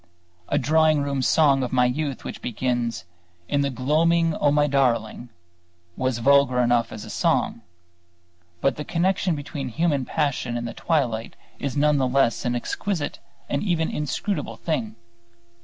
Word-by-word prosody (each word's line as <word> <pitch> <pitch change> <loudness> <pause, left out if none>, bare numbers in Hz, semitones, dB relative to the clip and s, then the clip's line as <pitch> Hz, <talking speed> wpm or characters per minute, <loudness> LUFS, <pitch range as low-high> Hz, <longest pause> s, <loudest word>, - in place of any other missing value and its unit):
A - - +1
drawing 155 +1 +3
room 140 -1 -1
song 140 0 +4
of 125 - -2
my 125 -1 +3
youth 140 +2 -2
which - - -7
began 120 0 -1 0.6
"In 145 - +1
the 140 - +1
gloaming, 160 +6 +2
O, 145 - +2
my 145 +1 +3
darling," 120 -4 0 0.7
was 130 -2 -1
vulgar 135 0 +4
enough 120 -1 +2
as 110 0 -7
a - - -10
song; 90 - 0 1.0
but 135 -2 +1
the 150 - -4
connection 180 +1 0
between 140 -2 -5
human 150 +1 0
passion 130 -6 -1
and 120 0 -4
the - - -6
twilight 120 -9 -1 0.2
is 140 0 -3
none 150 0 +3
the 130 - +2
less 125 -2 +1
an 120 0 0
exquisite 155 - -3 0.3
and 140 - -1
even 170 -5 0
inscrutable 150 +7 -3
thing. 115 -10 -3
140 Hz, 155 wpm, -24 LUFS, 125-150 Hz, 1.0 s, song